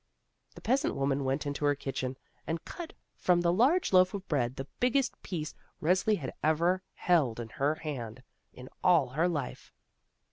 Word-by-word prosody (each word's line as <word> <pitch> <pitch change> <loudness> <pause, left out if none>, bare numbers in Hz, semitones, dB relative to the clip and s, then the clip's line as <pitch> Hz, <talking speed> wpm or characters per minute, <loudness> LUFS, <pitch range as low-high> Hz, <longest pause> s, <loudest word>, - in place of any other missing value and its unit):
The - - -11
peasant 260 +4 +1
woman 135 0 0
went 135 +3 0
into 145 0 -3
her 145 0 +3
kitchen, 130 -2 -4 0.3
and 165 0 -3
cut 345 -2 -7 0.2
from 180 -1 +2
the 170 0 +3
large 270 - +3
loaf 185 +1 +5
of 195 -1 -6
bread 130 -5 0
the 135 - -5
biggest 255 +1 +1
piece 160 -5 -4 0.3
Resli 185 +6 +2
had 135 - -5
ever 170 +4 +2
held 145 -11 +2
in 115 -1 -5
her 145 +6 0
hand, 130 -6 -6 0.3
in 125 0 -11 0.2
all 165 -8 +5
her 155 +7 +1
life. 145 -7 -4
155 Hz, 170 wpm, -30 LUFS, 135-185 Hz, 0.3 s, loaf